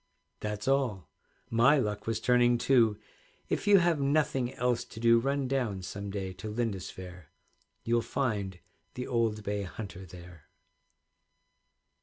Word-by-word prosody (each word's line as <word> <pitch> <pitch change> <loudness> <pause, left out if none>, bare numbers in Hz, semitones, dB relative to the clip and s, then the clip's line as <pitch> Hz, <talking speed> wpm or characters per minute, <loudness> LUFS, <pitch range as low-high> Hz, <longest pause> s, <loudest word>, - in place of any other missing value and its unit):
That's 105 +1 -4
all. 120 - 0 0.4
My 120 +6 +5
luck 105 -5 -2
was 115 -1 0
turning 120 0 +4
too; 115 -4 +3 0.5
If - - -2
you 205 -1 +8
have 170 -5 +2
nothing 140 -3 +1
else 125 -1 0
to 110 - -11
do, 115 0 +5
Run 135 +2 0
down 120 -8 -1
some 100 +2 -6
day 95 -2 -4
to 110 - -5
Lindisfaire, 95 -6 -5 0.6
You'll 120 0 +2
find 105 -8 -2 0.4
the 125 - -4
old 115 -4 0
bay 100 0 -2
hunter 95 -1 -7
there. 85 -2 -13
115 Hz, 135 wpm, -30 LUFS, 100-125 Hz, 0.6 s, you